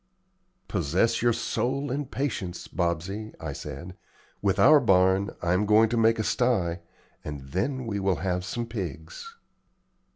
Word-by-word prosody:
"Possess 90 +3 +1
your 120 0 +4
soul 130 +4 -1
in 140 +1 -2
patience, 110 -11 -3
Bobsey," 90 +5 -3
I 80 -3 -5
said. 75 +6 -8 0.5
"With 100 -2 +1
our 150 +2 +7
barn, 95 -3 +3
I 85 0 +2
am 100 +3 +1
going 110 +1 +5
to 120 - -1
make 115 0 +4
a 110 - -1
sty, 95 -9 +1 0.4
and 75 -2 -6
then 125 - -2
we 105 -3 -2
will 95 -1 +1
have 90 -1 0
some 115 +6 -3
pigs." 100 - -7
100 Hz, 150 wpm, -27 LUFS, 90-120 Hz, 0.5 s, our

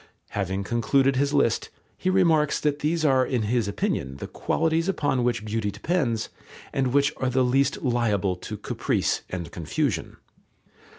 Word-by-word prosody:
Having 95 0 -2
concluded 130 +5 +2
his 140 +2 +1
list, 140 -6 +1 0.3
he 185 - -1
remarks 165 -6 +3
that 150 -1 0
these 160 +1 0
are 130 -3 +4
in 125 -3 -1
his 115 0 +1
opinion 70 -8 -2
the - - -6
qualities 165 +2 0
upon 145 -8 +1
which 120 -3 0
beauty 110 -1 -1
depends 115 - -1 0.4
and 135 -1 +1
which 140 +2 +3
are 130 - 0
the 130 +1 +2
least 135 +2 +1
liable 110 -7 +1
to - - -7
caprice - - -1
and 85 -3 -5
confusion. 95 - -2
130 Hz, 155 wpm, -25 LUFS, 105-145 Hz, 0.4 s, are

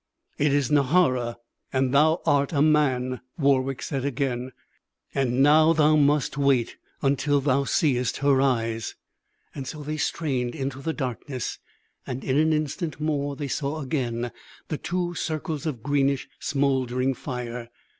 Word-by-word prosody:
"It 145 0 +3
is 140 -2 +1
Nahara, 130 -5 +3 0.4
and 130 0 +1
thou 155 +4 +4
art 140 +1 +2
a 140 - +2
man," 130 -5 +2 0.2
Warwick 135 -2 +1
said 135 -4 -3
again. 130 -2 -2 0.6
"And 130 -1 +2
now 155 +3 +6
thou 155 -1 +4
must 145 -1 +2
wait 135 -4 +2 0.3
until 140 +1 +2
thou 140 0 +1
seest 125 -6 +1
her 140 -1 +3
eyes." 115 -4 0 0.7
So 150 +3 -7
they 155 +1 -3
strained 135 -5 -1
into 135 -2 -4
the 160 +3 -2
darkness; 130 -2 -4 0.5
and 130 +1 -4
in 135 +1 +1
an 160 +1 +3
instant 155 0 -2
more 145 -2 -1
they 145 +1 -4
saw 140 +3 -2
again 120 -4 -2 0.4
the 155 - -3
two 175 0 -2
circles 155 -2 -3
of 125 -8 -4
greenish, 140 -1 +1
smouldering 135 -2 0
fire. 125 -2 -6
140 Hz, 140 wpm, -25 LUFS, 130-150 Hz, 0.7 s, now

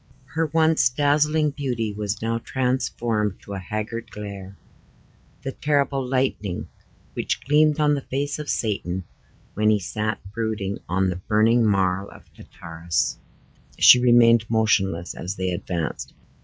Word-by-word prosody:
Her 165 0 +1
once 160 -3 +3
dazzling 150 +3 +2
beauty 120 -7 -3
was 105 +1 -3
now 115 0 -1
transformed 120 -5 -1
to 100 - -8
a 100 - -4
haggard 110 +4 -5
glare 100 -2 -8 0.9
the 135 - -3
terrible 140 -1 0
lightning 125 -7 -2 0.4
which - - -2
gleamed 150 +1 +3
on 150 -1 +3
the 140 - -1
face 140 +3 -3
of 150 - -6
Satan, 95 -4 -2 0.5
when 105 +1 +2
he 110 - +4
sat 105 +2 -3 0.2
brooding 110 -3 -3
on 95 +1 +1
the 90 - -4
burning 115 +2 +4
marl 95 -2 +1
of - - -15
Tartarus. 80 -5 -3 0.6
She 125 - +8
remained 120 -2 +5
motionless 95 -6 +1
as 90 +3 -5
they 95 -1 -2
advanced. 85 -2 -4
110 Hz, 135 wpm, -23 LUFS, 100-135 Hz, 0.9 s, She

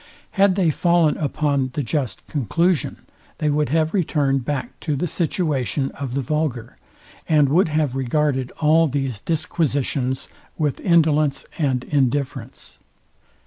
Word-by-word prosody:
Had 195 -1 +3
they 180 -5 +2
fallen 170 -1 +2
upon 140 -2 0
the 145 - -2
just 135 -2 -3
conclusion, 160 - -1 0.3
they 150 -1 0
would 150 0 +1
have 160 +2 +1
returned 145 -8 +1
back 140 +1 -4
to 150 -3 -2
the 140 - -1
situation 150 -5 -1
of 135 -3 -5
the 140 - 0
vulgar, 140 -3 -2 0.5
and 150 -3 +5
would 170 +6 +4
have 150 -4 0
regarded 135 0 0
all 160 +1 +4
these 135 -5 -2
disquisitions 140 -5 -1 0.3
with 150 -4 -1
indolence 155 -5 +2
and 130 -5 0
indifference. 130 -3 -2
145 Hz, 130 wpm, -22 LUFS, 135-160 Hz, 0.5 s, and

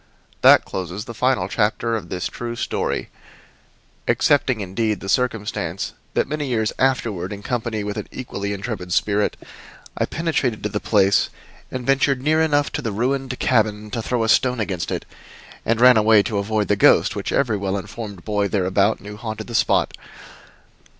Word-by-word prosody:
That - - +7
closes 95 +3 -5
the 115 - -7
final 125 -6 +1
chapter 115 +2 0
of 110 - -5
this 90 -1 -3
true 120 0 -4
story - - -2 1.0
excepting, 135 -5 +2
indeed, 105 +1 -1
the 95 - -8
circumstance 105 -7 -1 0.2
that - - +2
many 150 0 -3
years 110 -4 0
afterward, 115 -9 0
in 100 0 -7
company 115 -3 -2
with 105 +1 -4
an 105 - -4
equally 100 -5 -5
intrepid 100 -3 -4
spirit, 105 +2 +1 0.6
I - - 0
penetrated 155 -8 -1
to 105 - -1
the 105 - -2
place 100 -2 +3 0.4
and 130 -1 -5
ventured 135 0 +2
near 155 +4 +2
enough 145 -2 +2
to - - -3
the 115 -5 -2
ruined 130 +4 -1
cabin 105 -3 +1
to 115 - -2
throw 120 +1 -1
a - - 0
stone 125 +1 +3
against 95 -6 -2
it, - - -3 0.6
and 115 0 +2
ran 125 -1 +7
away 110 -1 +5
to 100 +1 -1
avoid 105 +1 0
the 105 - +2
ghost 100 - +4
which - - -3
every 125 -6 +1
well 100 0 -2
informed 100 -1 -7
boy 105 -2 0
thereabout 100 +1 +1
knew 105 +1 -9
haunted 110 -1 -5
the 120 - -9
spot. - - +2
110 Hz, 170 wpm, -22 LUFS, 100-125 Hz, 1.0 s, That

